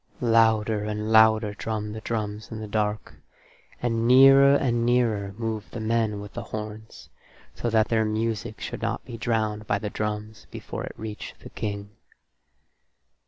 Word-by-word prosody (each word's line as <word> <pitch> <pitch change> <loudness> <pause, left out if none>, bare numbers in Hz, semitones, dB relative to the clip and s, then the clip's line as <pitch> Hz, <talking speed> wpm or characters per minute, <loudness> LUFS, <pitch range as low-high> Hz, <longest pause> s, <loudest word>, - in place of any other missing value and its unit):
Louder 110 -2 +3
and 105 +1 -3
louder 110 -1 +5
drummed 105 0 -4
the 110 - -7
drums 110 -1 -4
in 110 - -5
the 110 - -6
dark, 105 0 -2 0.7
and 115 -1 +1
nearer 135 +2 +8
and 120 -4 +1
nearer 115 -5 +1
moved 110 -2 -4
the 115 - -7
men 110 -1 0
with 100 -1 -9
the - - -5
horns, 110 0 -8 0.4
so 120 - -3
that 110 -1 +2
their 110 -1 +2
music 110 -1 -2
should - - -6
not - - -2
be 120 - -8
drowned 110 -2 -1
by 100 - +1
the 105 0 -5
drums 105 0 -4
before - - -6
it - - -9
reached 110 -1 -8
the - - -11
King. 100 -1 -5
110 Hz, 160 wpm, -25 LUFS, 105-115 Hz, 0.7 s, nearer